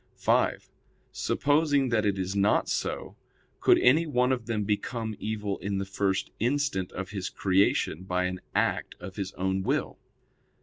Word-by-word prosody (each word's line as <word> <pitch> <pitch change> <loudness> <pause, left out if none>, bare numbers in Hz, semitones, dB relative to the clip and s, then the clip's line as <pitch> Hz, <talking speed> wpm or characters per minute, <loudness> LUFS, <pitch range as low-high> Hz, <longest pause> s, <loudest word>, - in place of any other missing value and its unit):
(5) - - +1 0.4
Supposing 145 -2 +2
that 110 -3 +2
it 100 -1 0
is 95 +1 -2
not 100 +1 +3
so, - - -3 0.4
could - - +5
any 155 +7 +4
one 125 -3 +2
of 125 -3 -2
them 110 -3 -1
become 110 +2 -2
evil 105 -2 -3
in 100 0 -2
the 100 - -2
first 95 0 -1
instant 125 -6 0
of 95 +1 -5
his 100 -3 -3
creation 95 -3 +1
by 90 -1 0
an 90 0 -3
act - - 0
of 95 +2 -9
his 100 -1 -3
own 95 +1 -1
will? - - -1
100 Hz, 160 wpm, -28 LUFS, 95-125 Hz, 0.4 s, could